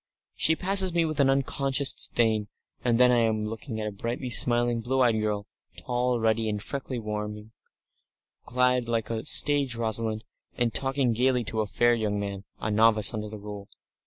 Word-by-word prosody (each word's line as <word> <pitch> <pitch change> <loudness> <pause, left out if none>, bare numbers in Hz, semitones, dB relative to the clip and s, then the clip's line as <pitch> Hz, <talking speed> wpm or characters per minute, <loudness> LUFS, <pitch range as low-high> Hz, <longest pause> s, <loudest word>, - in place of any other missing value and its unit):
She 160 - +3
passes 190 0 +4
me 170 -1 +3
with 155 -2 -4
an 135 -1 +4
unconscious 135 0 +1
disdain; 110 -3 +1 0.4
and 120 -1 +1
then 125 0 +6
I 120 - +3
am 110 -2 0
looking 110 +1 -6
at 110 - -3
a 105 - -3
brightly 120 +5 -5
smiling, 120 -1 +3
blue 130 +3 -1
eyed 115 -3 +2
girl, 105 -1 -2 0.3
tall, 125 0 -1
ruddy, 110 0 0
and 105 -1 -3
freckled 130 +1 -6
warmly, 105 0 -6 0.9
clad 125 -1 +1
like 115 -1 -2
a 110 -1 -3
stage 140 -4 +2
Rosalind, 110 -1 -2 0.3
and 120 -2 0
talking 135 -2 0
gaily 125 +1 +1
to 110 0 -2
a 105 - -3
fair 120 +4 +2
young 105 -3 -1
man, 100 -1 -5
a 105 - -3
novice 110 -1 +4
under 105 -1 -5
the 110 - -8
Rule. 105 -1 -9
115 Hz, 180 wpm, -26 LUFS, 110-125 Hz, 0.9 s, then